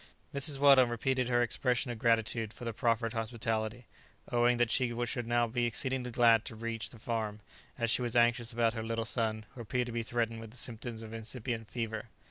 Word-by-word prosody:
Mrs. 140 +1 +3
Weldon 135 -3 +6
repeated 125 +2 0
her 120 -1 +3
expression 125 +1 0
of 115 - -6
gratitude 115 -1 +1
for 120 - -9
the 115 - -2
proffered 115 0 0
hospitality, 115 0 -2 0.5
owning 120 0 +3
that 120 -1 +2
she 125 -1 +1
should 120 -1 -3
now 120 0 +3
be 120 +1 0
exceedingly 130 +1 0
glad 115 -2 +5
to 120 - -6
reach 115 0 -4
the 120 - -13
farm, 110 -2 -3 0.4
as 115 -2 0
she - - +2
was 120 -1 -2
anxious 120 0 +3
about 115 -1 +2
her 115 - -4
little 115 0 -2
son, 110 -2 -1
who 130 - -8
appeared 125 +2 -1
to 120 - -6
be 115 0 -1
threatened 115 0 -2
with 115 -1 -9
the 120 - -12
symptoms 115 -1 -3
of 110 0 -9
incipient 115 0 -5
fever. 110 -2 -3
115 Hz, 205 wpm, -32 LUFS, 115-120 Hz, 0.5 s, Weldon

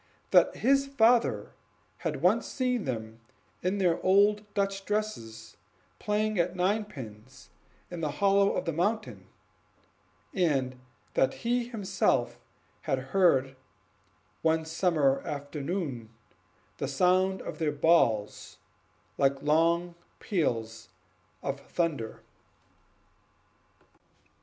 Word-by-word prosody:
That 180 - +5
his 275 +3 +2
father 235 - +2 0.5
had 150 -2 -4
once 205 +6 +3
seen 250 -5 -1
them 110 -3 -5 0.4
in 185 +3 0
their 175 -4 +1
old 205 +2 +3
Dutch 195 -1 -1
dresses 195 - -4 0.4
playing 215 -1 0
at 175 +1 0
ninepins 145 - -4 0.4
in 170 -2 -6
a 150 - 0
hollow 200 +5 +3
of - - -2
the 165 - -1
mountain; 150 - -2 1.1
and 135 -8 0 0.3
that 135 - +2
he 240 0 +1
himself 195 - 0 0.4
had 140 -5 -1 0.2
heard, 135 -9 +3 0.9
one 160 0 +1
summer 160 -5 +1
afternoon, 145 - -4 0.7
the - - -2
sound 185 +6 +2
of - - -7
their 155 -2 +1
balls 140 -12 +1 0.6
like 135 0 +2
distant 170 +3 +2 0.2
peals 115 - -2 0.5
of 140 0 -3
thunder. 145 -9 -3
170 Hz, 100 wpm, -29 LUFS, 135-200 Hz, 1.1 s, That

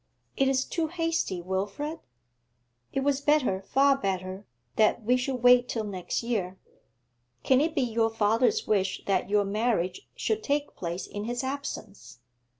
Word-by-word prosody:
'It 270 - +2
is 265 0 +2
too 330 -2 -1
hasty, 330 - -1
Wilfrid. 200 - -3 0.9
It 270 - -1
was 280 0 +1
better, 285 -10 +2
far 275 +7 +3
better, 190 -4 -3 0.3
that 220 +1 +3
we 245 +4 +3
should 255 -1 -2
wait 245 0 +6
till 225 - -2
next 190 0 -3
year. 195 -6 -2 0.9
Can 260 0 +4
it 320 +1 0
be 275 - +2
your 225 -1 +1
father's 225 - +2
wish 195 -3 0
that 190 -1 0
your 205 0 +3
marriage 215 - -1
should 440 0 -1
take 290 -4 -1
place 175 +1 -4
in 205 +1 -6
his 240 +2 -3
absence? 265 - -6
240 Hz, 150 wpm, -28 LUFS, 195-275 Hz, 0.9 s, wait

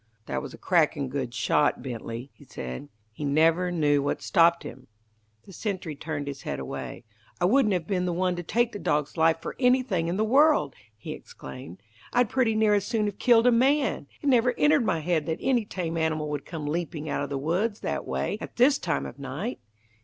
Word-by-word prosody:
"That 65 -6 -3
was - - -7
a - - -11
cracking 155 -6 +1
good 130 -2 -3
shot, 130 +2 +1
Bently," 120 0 -6
he - - -18
said. 65 - -7 0.2
"He 110 - -8
never 160 +5 +3
knew 150 -4 +2
what 140 - -1
stopped 170 0 +4
him." 130 +1 -10 0.6
The 195 - -13
sentry 180 -6 -4
turned 145 0 -4
his 140 -1 -6
head - - -4
away. - - -6 0.4
"I 175 - +2
wouldn't 215 +1 +4
have 170 -3 -2
been 180 0 -1
the 180 - 0
one 180 +1 0
to - - -2
take 235 +7 +1
that 205 - -7
dog's 150 -1 0
life 165 0 +3
for - - -5
anything 250 -9 +2
in 175 +2 -1
the 215 - +2
world!" 270 - +4 0.2
he 110 - -7
exclaimed. 65 +7 -10 0.3
"I'd 245 -3 +3
pretty 240 -4 +2
near 215 -1 +3
as 205 -2 +2
soon 220 -2 0
have 205 -1 -4
killed 235 -1 +5
a 250 - +6
man. 265 - +2 0.2
It - - -2
never 250 -1 +4
entered 295 -3 +4
my 165 - +1
head 160 -2 0
that 160 0 -1
any 245 -4 +1
tame 170 -5 -3
animal 155 -2 -1
would 145 -1 -4
come 160 -3 -5
leaping 155 0 -3
out 145 - -1
of 145 - -3
the 140 - -2
woods 185 +10 -1
that - - -2
way - - -2
at - - -8
this 270 +4 +4
time 70 - -1
of 65 - -9
night. - - -4
170 Hz, 215 wpm, -26 LUFS, 145-220 Hz, 0.6 s, a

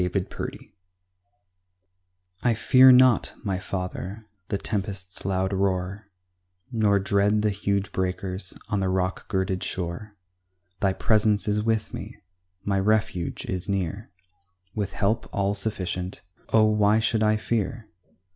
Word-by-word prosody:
GOD'S 90 +1 -1
CARE - - -4 1.9
I 120 -2 +2
fear 130 +4 +7
not, 125 -2 +5
my 95 -4 -1
Father, 95 +3 -5 0.2
the 100 - -1
tempest's 95 -3 -3
loud 95 0 0
roar, 95 +1 -1 0.6
Nor 105 -4 +3
dread 100 +2 +2
the 105 - +2
huge 100 0 -1
breakers 95 0 -3
on 105 -2 0
the 95 -1 0
rock 95 0 -1
girded 95 -3 -1
shore; 90 +4 -4 0.6
Thy 95 -1 +2
presence 105 +1 +2
is 105 0 +1
with 110 0 -1
me, - - -7 0.5
my 100 -1 +1
refuge 105 -3 0
is 90 +1 -4
near, 100 +2 -2 0.6
With 105 -3 -3
help 105 +3 0
all 100 0 0
sufficient; 95 -3 -3 0.3
oh, 110 - +5
why 105 0 +4
should 110 0 +1
I 110 0 +3
fear? 110 0 -2
100 Hz, 125 wpm, -25 LUFS, 95-110 Hz, 1.9 s, fear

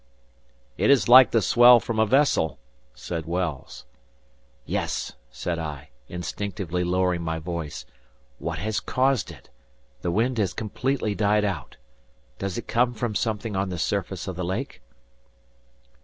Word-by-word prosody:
"It - - +3
is 130 -8 +5
like 130 +1 +9
the 115 -3 +2
swell 120 +3 +7
from 115 -1 -3
a 110 - +4
vessel," 130 - +2 0.4
said 80 +5 -5
Wells. 85 -5 -4 0.8
"Yes," - - -2 0.2
said 85 +6 -4
I, 75 -4 -6 0.2
instinctively 90 0 -4
lowering 90 0 +1
my 80 -1 -2
voice. 80 -2 -5 0.5
"What - - -3
has 110 +1 -1
caused 130 -2 +1
it? - - -14 0.5
The 90 - -1
wind 115 +6 +1
has 95 -4 0
completely 110 +1 -1
died 105 +1 +2
out. 85 -10 -4 0.6
Does 95 -2 -3
it 120 - -6
come 120 +1 +1
from 115 -1 -2
something 110 0 -2
on 95 0 -1
the 90 - -4
surface 95 +1 -2
of 95 - -4
the 90 - -4
lake?" 85 -7 -4
100 Hz, 140 wpm, -25 LUFS, 85-115 Hz, 0.8 s, like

